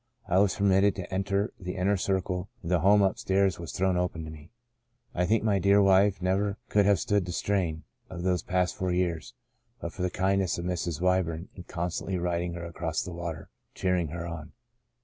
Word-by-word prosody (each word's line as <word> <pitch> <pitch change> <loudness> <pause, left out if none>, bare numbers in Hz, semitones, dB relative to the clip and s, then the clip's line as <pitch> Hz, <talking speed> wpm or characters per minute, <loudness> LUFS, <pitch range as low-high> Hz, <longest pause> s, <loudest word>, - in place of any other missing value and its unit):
I 90 0 +3
was 100 -1 +3
permitted 100 0 +3
to 95 -1 -6
enter 100 +3 0
the 90 -1 -5
inner 95 +2 +2
circle 95 -1 -1
and 85 - -4
the 90 - +4
home 100 +4 +5
up 95 - +1
stairs 95 -2 +1
was 85 -1 -6
thrown 95 -1 +1
open 90 -2 -1
to 80 - -7
me. 75 +1 -12 0.6
I 90 0 0
think 110 +2 +2
my 105 -3 +2
dear 100 +2 +5
wife 95 -1 +4
never 100 +2 +1
could 105 -1 +3
have 100 -4 +4
stood 100 +2 +1
the - - -3
strain 90 -4 -1 0.3
of 90 -2 -6
those 90 -1 +1
past 90 0 0
four 95 -3 -1
years, 90 -3 -1 0.4
but 85 - -5
for 95 - -7
the 90 - +1
kindness 95 0 +1
of 85 - -4
Mrs. 85 -2 -2
Wyburn 90 -2 0
in 90 - -11
constantly 90 +2 -3
writ 85 -1 -1
ing 85 -1 -3
her 85 0 -6
across 85 -1 -3
the 90 - -7
water 85 -1 -6 0.3
cheering 90 -3 +1
her 85 +3 -5
on. 80 -2 -7
90 Hz, 210 wpm, -28 LUFS, 85-95 Hz, 0.6 s, home